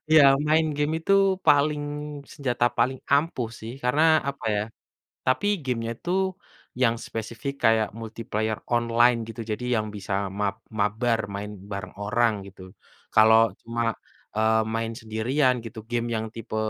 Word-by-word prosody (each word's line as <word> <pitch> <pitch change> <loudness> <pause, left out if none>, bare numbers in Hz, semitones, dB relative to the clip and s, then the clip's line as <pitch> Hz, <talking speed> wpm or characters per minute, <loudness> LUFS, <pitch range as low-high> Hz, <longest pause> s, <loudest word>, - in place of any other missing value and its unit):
iya, 155 -1 +7 0.3
main 160 +1 +4
game 150 +1 0
itu 195 - +2 0.3
paling 145 +1 +4 0.5
senjata 125 -4 -1
paling 130 0 +2
ampuh 140 -5 +2
sih, 115 +2 -6
karena 145 +5 +3 0.3
apa 140 -3 -5
ya 105 - +1 0.6
tapi 130 +11 +2 0.2
game-nya 115 -3 -2
tuh 185 +2 +1 0.6
yang 115 -2 +3
spesifik 115 +5 -5
kayak 110 -1 +3
multiplayer 110 -1 -3 0.2
online 120 0 +4
gitu. 115 +1 -7
Jadi 110 +3 -3
yang 110 0 -1
bisa 100 0 -6 0.2
mab 100 0 -1 0.2
mabar, 110 +3 +1 0.2
main 105 +1 -4 0.2
bareng 95 -2 -5
orang 115 +3 +2 0.2
gitu. 95 -1 -14 0.5
Kalau 110 +1 +6
cuma, 115 0 -1 0.4
eee, 110 +1 +3
main 115 0 -1
sendirian 125 +4 +1
gitu, 115 0 -8
game 120 0 -1
yang 110 0 -1
tipe 115 -1 -6
115 Hz, 140 wpm, -25 LUFS, 110-130 Hz, 0.6 s, iya